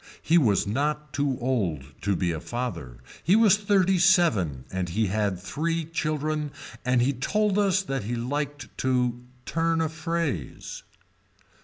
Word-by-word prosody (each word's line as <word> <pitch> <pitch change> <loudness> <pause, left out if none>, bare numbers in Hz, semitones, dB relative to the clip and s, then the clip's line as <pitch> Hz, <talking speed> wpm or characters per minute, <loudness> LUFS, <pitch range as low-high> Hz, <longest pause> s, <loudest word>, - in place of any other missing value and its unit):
He 170 +2 +5
was 105 -10 +3
not 150 +6 -1
too 140 -2 0
old 105 - 0 0.2
to 100 -1 +1
be 90 -1 0
a 80 - -3
father 85 - -5 0.2
he 185 - +4
was 215 -3 +6
thirty 195 -3 +2
seven 155 - +3
and 95 -2 -2
he 110 +6 +1
had 100 -1 0
three 160 - -2
children 155 -1 -2 0.3
and 125 -1 +3
he 135 +3 +2
told 205 - +1
us 195 -1 +2
that 135 - -3
he 120 +3 -2
liked 145 +4 -4
to 125 -2 0 0.2
turn 165 0 +1
a 160 -1 +1
phrase. 160 - -3
140 Hz, 150 wpm, -26 LUFS, 105-165 Hz, 0.3 s, was